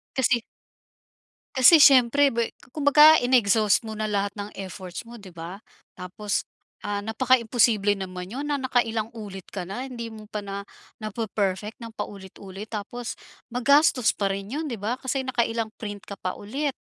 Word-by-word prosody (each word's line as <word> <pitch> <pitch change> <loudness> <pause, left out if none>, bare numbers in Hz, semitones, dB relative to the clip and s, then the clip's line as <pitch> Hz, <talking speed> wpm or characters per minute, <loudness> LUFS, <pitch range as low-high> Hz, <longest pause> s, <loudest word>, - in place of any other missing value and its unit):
Kasi 250 -2 +2 1.2
kasi 295 +5 +8
siyempre 275 0 +6
bwe 230 -1 -1 0.2
kumbaga 300 +1 +7
in-exhaust 220 -3 +3
mo 220 -1 -6
na 215 - -2
lahat 200 0 0
ng 205 0 -6
efforts 185 0 -7
mo 240 - -10
'di 195 -5 -13
ba? 170 +4 -8 0.4
Tapos, 190 +3 -3 0.4
ah, 205 -1 -2
napakaimposible 220 -2 +2
naman 185 -1 -6
'yun 280 +3 -4
na 285 -2 0
nakailang 230 -4 0
ulit 195 -4 -8
ka 190 -3 -5
na, 210 +9 -5
hindi 235 -3 -6
mo 215 -1 -11
pa 210 -1 -5
na 200 0 -5 0.4
nape-perfect 215 -1 -3
ng 230 -1 -8
paulit-ulit. 195 0 -8
Tapos, 230 +3 -5 0.3
magastos 250 0 +4
pa 200 - -1
rin 195 +1 -4
'yun 305 +3 -2
'di 235 - -4
ba 220 +5 -2
kasi 265 0 -2
nakailang 230 -3 -1
print 205 -2 -6
ka 200 - -7
pa 185 - -3
ulit, 275 +7 -3
220 Hz, 155 wpm, -25 LUFS, 200-250 Hz, 1.2 s, kasi